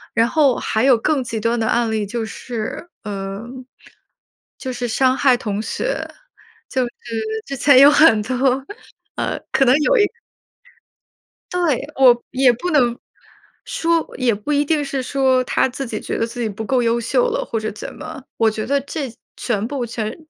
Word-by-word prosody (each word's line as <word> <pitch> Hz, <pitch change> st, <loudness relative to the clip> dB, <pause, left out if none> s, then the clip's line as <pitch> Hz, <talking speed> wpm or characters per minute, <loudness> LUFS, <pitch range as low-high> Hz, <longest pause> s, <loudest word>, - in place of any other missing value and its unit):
然 230 Hz, -, +4 dB
后， 280 Hz, -2 st, +3 dB
还 220 Hz, -, -1 dB
有 265 Hz, -1 st, +6 dB
更 270 Hz, +4 st, 0 dB
极 230 Hz, -2 st, -4 dB
端 230 Hz, +2 st, 0 dB
的 225 Hz, -, 0 dB
案 235 Hz, -1 st, +1 dB
例 215 Hz, -1 st, -1 dB
就 230 Hz, +3 st, -3 dB
是 225 Hz, +6 st, -6 dB
呃， 195 Hz, 0 st, -5 dB, 1.2 s
就 260 Hz, -, -4 dB
是 245 Hz, -1 st, -3 dB
伤 260 Hz, +3 st, +2 dB
害 265 Hz, -2 st, +4 dB
同 210 Hz, -4 st, -3 dB
学， -, -, -3 dB, 0.6 s
就 260 Hz, -, 0 dB
是 240 Hz, -, -7 dB, 0.6 s
之 275 Hz, -, -4 dB
前 275 Hz, 0 st, +6 dB
有 280 Hz, +1 st, +9 dB
很 295 Hz, -7 st, +5 dB
多 255 Hz, +3 st, 0 dB, 0.5 s
呃， -, -, -2 dB
可 270 Hz, -, +3 dB
能 250 Hz, +1 st, +5 dB
有 310 Hz, -, +3 dB
一 420 Hz, -, +5 dB, 1.5 s
对。 340 Hz, -8 st, 0 dB
我 245 Hz, -3 st, +5 dB
也 260 Hz, -1 st, +4 dB
不 245 Hz, +10 st, -4 dB
能 245 Hz, -6 st, +3 dB, 0.7 s
说 330 Hz, -1 st, 0 dB
也 250 Hz, -3 st, +2 dB
不 210 Hz, +8 st, -4 dB
一 290 Hz, 0 st, +2 dB
定 300 Hz, 0 st, +1 dB
是 275 Hz, -1 st, -3 dB
说 260 Hz, -1 st, +2 dB
他 -, -, +1 dB
自 265 Hz, +2 st, -5 dB
己 220 Hz, -3 st, -4 dB
觉 -, -, -3 dB
得 230 Hz, -, +1 dB
自 240 Hz, +1 st, -6 dB
己 225 Hz, -, -1 dB
不 215 Hz, +2 st, -6 dB
够 255 Hz, +2 st, +1 dB
优 235 Hz, 0 st, +1 dB
秀 -, -, +1 dB
了 -, -, -2 dB
或 225 Hz, -, -2 dB
者 215 Hz, 0 st, -3 dB
怎 210 Hz, -, -8 dB
么， 315 Hz, -3 st, -9 dB
我 225 Hz, -1 st, +3 dB
觉 215 Hz, 0 st, -4 dB
得 280 Hz, +2 st, +1 dB
这 280 Hz, -2 st, -5 dB, 0.3 s
全 215 Hz, -3 st, -1 dB
部 270 Hz, -2 st, -3 dB
全 220 Hz, -2 st, -4 dB
250 Hz, 195 characters per minute, -20 LUFS, 225-280 Hz, 1.5 s, 有